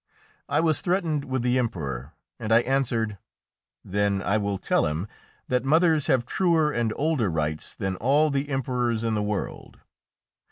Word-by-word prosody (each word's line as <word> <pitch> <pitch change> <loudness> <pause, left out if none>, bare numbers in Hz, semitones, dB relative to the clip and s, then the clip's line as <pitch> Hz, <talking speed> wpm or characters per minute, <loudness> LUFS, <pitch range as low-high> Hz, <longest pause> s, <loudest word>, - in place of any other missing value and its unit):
I 145 +2 +2
was 160 -2 +2
threatened 170 -6 0
with 130 -2 -2
the 125 +1 +2
Emperor, 75 - -3 0.3
and 110 -1 -4
I 115 +1 +6
answered, 120 -6 0 0.7
"Then 100 0 0
I 100 - +1
will 100 -1 -1
tell - - +1
him 80 +6 -3 0.4
that 125 0 +1
mothers 160 +1 +3
have 130 -5 +2
truer 165 -3 +2
and 120 -4 0
older 145 - +1
rights 75 -1 -2
than 95 -1 -3
all 145 +7 +3
the 140 +1 -1
emperors 125 -4 -1
in 115 -1 0
the 105 - 0
world!" 105 -1 -4
120 Hz, 160 wpm, -25 LUFS, 100-145 Hz, 0.7 s, I